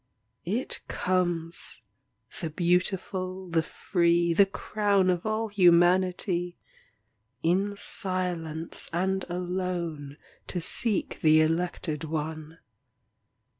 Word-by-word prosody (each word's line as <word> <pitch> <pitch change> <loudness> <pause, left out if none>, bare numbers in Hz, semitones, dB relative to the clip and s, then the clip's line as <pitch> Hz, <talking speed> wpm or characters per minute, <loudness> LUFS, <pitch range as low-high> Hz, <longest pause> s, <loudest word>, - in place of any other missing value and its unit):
It 225 +8 -2
comes, 175 -2 -1 0.6
the 165 - -3
beautiful, 185 +2 -1
the 165 -1 +2
free, 170 +1 +1
The 195 +4 +5
crown 200 -1 +1
of 180 +3 -2
all 215 +1 -1
humanity, 180 -1 +3 0.9
In 195 +5 +1
silence 175 -5 -3
and 190 +3 0
alone 175 -5 -3 0.3
To 180 - -3
seek 205 +4 +1
the 155 0 +6
elected 165 -1 -1
one. 155 0 -4
175 Hz, 90 wpm, -28 LUFS, 165-190 Hz, 0.9 s, the